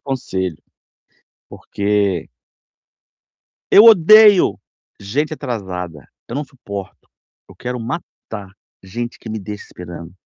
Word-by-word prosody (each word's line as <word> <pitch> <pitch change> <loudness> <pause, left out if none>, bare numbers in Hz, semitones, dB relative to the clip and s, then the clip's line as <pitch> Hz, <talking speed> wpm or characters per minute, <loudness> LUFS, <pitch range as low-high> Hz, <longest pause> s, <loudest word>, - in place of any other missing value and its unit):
conselho. 95 - -4 0.9
Porque 100 -4 -1 1.4
eu 205 - +9
odeio 210 - +7 0.4
gente 140 +11 -2
atrasada, 90 - -6 0.2
eu - - -8
não 145 - -2
suporto. 100 -9 -9 0.4
Eu - - -16
quero 125 0 -5
matar 115 - -7 0.3
gente 120 +6 -6
que 115 - -9
me 110 - -3
deixa 105 +1 -8
esperando. 85 -1 -10
105 Hz, 100 wpm, -19 LUFS, 95-135 Hz, 1.4 s, eu